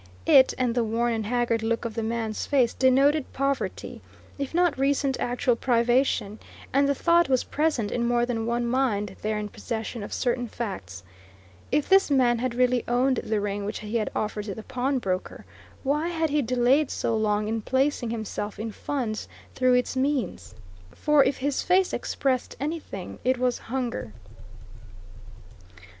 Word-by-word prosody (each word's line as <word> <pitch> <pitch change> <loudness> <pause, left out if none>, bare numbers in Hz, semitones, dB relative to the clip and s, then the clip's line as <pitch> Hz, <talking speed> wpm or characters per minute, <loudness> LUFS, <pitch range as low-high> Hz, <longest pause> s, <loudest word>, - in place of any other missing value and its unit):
It, 265 -2 +6
and 250 -2 +1
the 240 -1 +1
worn 230 +2 0
and 220 -2 -2
haggard 240 -1 +1
look 230 +1 -1
of 230 - -3
the 225 - -2
man's 225 -1 -3
face, 255 -5 +3
denoted 275 +3 +3
poverty, 275 0 -2 0.4
if 280 -1 -3
not 350 -1 +2
recent 275 0 +1
actual 245 0 +1
privation, 235 -3 +1 0.3
and 280 +1 +3
the 280 - +2
thought 340 +2 +3
was 260 -2 +2
present 295 -9 0
in 235 -1 0
more 240 0 +2
than 230 -2 -2
one 240 0 0
mind 230 -6 0
there 215 0 -1
in 210 0 -3
possession 225 +2 -5
of 205 - -7
certain 245 -1 -1
facts: 100 - -6 0.7
if 290 +2 +1
this 390 -2 +5
man 250 -4 +3
had 250 -1 -2
really 250 0 +2
owned 255 +2 +2
the 215 -2 -1
ring 205 0 -2
which 205 - -4
he 215 +2 -2
had 215 - -1
offered 210 -1 -2
to 200 - -5
the 220 - -8
pawnbroker, 250 -7 -2 0.4
why 295 +4 0
had 325 -3 -1
he 300 0 +2
delayed 255 +4 +2
so 230 - -1
long 210 -1 +1
in 225 0 -1
placing 260 0 0
himself 215 -2 -4
in 220 +1 -4
funds 230 -2 -3 0.3
through 255 -1 +3
its 250 +1 0
means? 260 - -2 0.4
For 300 -2 +4
if 275 - 0
his 280 +1 -1
face 370 +1 +2
expressed 260 -3 -1
anything, 290 - -5
it 255 +1 +2
was 250 -1 0
hunger. 240 - -3
245 Hz, 165 wpm, -26 LUFS, 220-270 Hz, 0.7 s, It